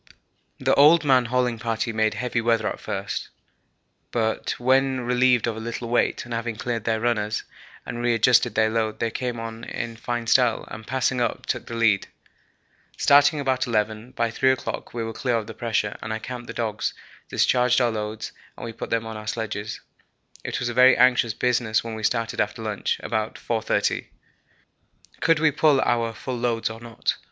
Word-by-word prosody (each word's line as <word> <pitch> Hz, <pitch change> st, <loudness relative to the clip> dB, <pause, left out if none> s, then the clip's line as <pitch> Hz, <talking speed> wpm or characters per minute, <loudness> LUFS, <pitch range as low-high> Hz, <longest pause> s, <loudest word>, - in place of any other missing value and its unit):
The -, -, +2 dB
old 155 Hz, +4 st, +6 dB
man 130 Hz, -3 st, +4 dB
hauling 125 Hz, -1 st, 0 dB
party 115 Hz, 0 st, -2 dB
made 110 Hz, -1 st, +1 dB
heavy 120 Hz, +1 st, -1 dB
weather 115 Hz, -1 st, +1 dB
at -, -, -4 dB
first, 100 Hz, 0 st, -4 dB, 0.8 s
but 110 Hz, -2 st, -1 dB
when 130 Hz, +1 st, +2 dB
relieved 125 Hz, -1 st, +3 dB
of 115 Hz, -2 st, -2 dB
a -, -, -6 dB
little 115 Hz, +1 st, -5 dB
weight 120 Hz, -, +1 dB
and 120 Hz, -, -7 dB
having 115 Hz, 0 st, -2 dB
cleaned 115 Hz, -1 st, -3 dB
their 110 Hz, -1 st, +1 dB
runners 110 Hz, -2 st, 0 dB, 0.4 s
and 120 Hz, -, -5 dB
re 120 Hz, -1 st, +2 dB
adjusted 115 Hz, +2 st, +4 dB
their 110 Hz, 0 st, +3 dB
load 110 Hz, -1 st, -1 dB
they 115 Hz, -, -1 dB
came 120 Hz, -1 st, -3 dB
on 115 Hz, 0 st, -7 dB
in 115 Hz, -1 st, -5 dB
fine 120 Hz, 0 st, -3 dB
style, 120 Hz, -1 st, +3 dB
and, 110 Hz, -1 st, -8 dB
passing 130 Hz, -1 st, 0 dB
us, 120 Hz, -, 0 dB
took -, -, -3 dB
the 115 Hz, -, -5 dB
lead. 115 Hz, -4 st, +2 dB, 0.9 s
Starting 145 Hz, +2 st, +5 dB
about 130 Hz, -3 st, 0 dB
11, 110 Hz, +1 st, -1 dB
by 115 Hz, -1 st, 0 dB
3 130 Hz, +3 st, +2 dB
o'clock 130 Hz, -, -4 dB
we 115 Hz, -1 st, -3 dB
were 115 Hz, 0 st, -4 dB
clear 125 Hz, +1 st, -1 dB
of 110 Hz, -2 st, -1 dB
the 110 Hz, -, -8 dB
pressure, 110 Hz, -2 st, -1 dB
and 110 Hz, -, -5 dB
I 110 Hz, -, -1 dB
camped 120 Hz, +1 st, -7 dB
the -, -, -6 dB
dogs, 110 Hz, -3 st, -2 dB, 0.3 s
discharged 125 Hz, 0 st, +3 dB
our 120 Hz, -2 st, +2 dB
loads, 110 Hz, 0 st, -4 dB, 0.3 s
and -, -, -7 dB
we 115 Hz, -, -6 dB
put -, -, -6 dB
them 115 Hz, -1 st, 0 dB
on 110 Hz, -1 st, -6 dB
our 110 Hz, 0 st, -9 dB
sledges. 110 Hz, -1 st, -4 dB, 0.6 s
It -, -, -3 dB
was 125 Hz, -, -2 dB
a 120 Hz, -, -2 dB
very 125 Hz, +1 st, +6 dB
anxious 125 Hz, -3 st, +4 dB
business 120 Hz, -3 st, +1 dB
when 115 Hz, -1 st, -5 dB
we 110 Hz, -, -6 dB
started 115 Hz, +1 st, 0 dB
after 105 Hz, +2 st, -3 dB
lunch, 105 Hz, -2 st, -2 dB
about 110 Hz, -1 st, -2 dB
4.30. 115 Hz, -2 st, -1 dB, 1.1 s
Could 165 Hz, -1 st, +3 dB
we 155 Hz, -1 st, +4 dB
pull 150 Hz, -1 st, +3 dB
our 115 Hz, -1 st, +1 dB
full 125 Hz, +2 st, -5 dB
loads 115 Hz, -2 st, 0 dB
or 110 Hz, -, -9 dB
not? 115 Hz, -2 st, -3 dB
115 Hz, 190 wpm, -24 LUFS, 110-125 Hz, 1.1 s, old